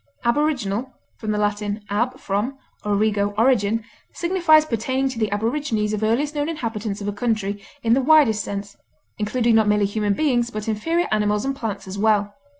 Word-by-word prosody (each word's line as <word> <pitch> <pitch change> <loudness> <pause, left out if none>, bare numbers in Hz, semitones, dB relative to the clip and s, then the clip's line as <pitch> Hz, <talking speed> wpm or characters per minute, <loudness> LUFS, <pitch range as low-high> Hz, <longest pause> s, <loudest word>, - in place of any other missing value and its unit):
Aboriginal 255 -3 0 0.3
(L. 210 -1 +1 0.4
ab, 245 +5 0
from, 210 +7 -2 0.3
origo, 205 0 +1
origin) 225 -2 +2 0.3
signifies 340 -3 +4
pertaining 260 +2 -1
to 250 -3 -6
the 215 -2 +1
aborigines 220 -1 -1
or 215 0 -2
earliest 260 +7 +1
known 295 +1 -1
inhabitants 225 -9 -4
of 200 - -4
a 205 - -1
country 205 -2 -2 0.2
in 230 0 +3
the 265 - +3
widest 265 -8 +4
sense, 200 0 -6 0.4
including 230 +2 +1
not 220 -1 +4
merely 210 0 +3
human 205 0 0
beings 245 -5 +1
but 215 -2 -6
inferior 325 +11 0
animals 210 0 +1
and 275 0 -1
plants 205 -6 -5
as 190 +1 -6
well. 205 -1 +2
220 Hz, 160 wpm, -22 LUFS, 205-260 Hz, 0.4 s, signifies